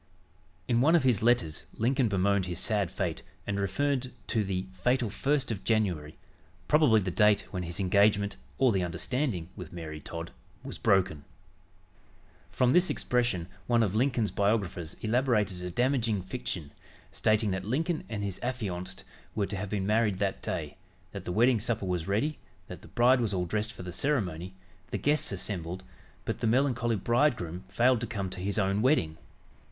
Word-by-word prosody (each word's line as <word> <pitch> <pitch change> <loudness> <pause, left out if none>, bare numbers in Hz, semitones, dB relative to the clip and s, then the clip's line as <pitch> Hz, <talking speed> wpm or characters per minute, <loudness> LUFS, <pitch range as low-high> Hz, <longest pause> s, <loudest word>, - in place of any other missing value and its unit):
In 120 -1 +3
one 160 +6 +5
of 165 - +4
his 125 -6 +3
letters 110 -9 +1
Lincoln 125 +2 +2
bemoaned 100 -1 +1
his 90 - -3
sad 105 -5 0
fate 90 -3 -3 0.2
and 100 -1 -2
referred 130 +6 0 0.2
to 110 -3 +1
"the 95 -1 -2
fatal 120 +3 +1
1st 135 +2 0
of 105 - -4
January," 90 -9 0 0.5
probably 150 -8 +5
the 90 -1 -2
date 105 +1 +4
when 90 - -3
his 85 +2 -5
engagement 100 +1 +3 0.2
or 130 -2 +4
"the 95 -3 +1
understanding" 90 - -2
with 90 -5 -8
Mary 80 -3 -6
Todd 85 +2 -6 0.3
was - - -7
broken. 95 -6 +2 1.3
From 125 -1 +2
this 180 +4 +4
expression, 120 -8 0 0.2
one 120 -1 +4
of 100 -3 0
Lincoln's 120 -2 +1
biographers 100 -5 0
elaborated 110 -5 +1
a 90 - -3
damaging 115 -1 +1
fiction, 90 - -5 0.4
stating 110 -1 +2
that 95 0 -2
Lincoln 155 - -1
and 105 -3 -3
his 100 -2 -4
affianced 100 -6 -4 0.3
were 105 -2 +1
to 100 - -4
have 100 +1 -4
been 100 -2 -1
married 105 -1 +2
that 100 -1 -1
day, - - -4 0.3
that - - -7
the - - -3
wedding 120 +4 +4
supper 115 -2 -1
was 90 -3 -2
ready, 120 +10 0 0.3
that 90 - -8
the - - -13
bride 125 +1 +4
was 105 -4 0
all 90 -1 0
dressed 105 +4 -2
for 95 - -9
the 90 -1 -6
ceremony, 95 - -1 0.3
the - - -2
guests 150 +1 +1
assembled 90 -2 -3 0.4
but - - -2
the - - 0
melancholy 120 -1 +2
bridegroom 110 - +1
failed 125 0 +3
to 120 - -2
come 100 -5 -3
to 95 - -6
his 100 +2 -2
own 100 0 +1
wedding! 95 - +2
105 Hz, 170 wpm, -29 LUFS, 95-120 Hz, 1.3 s, one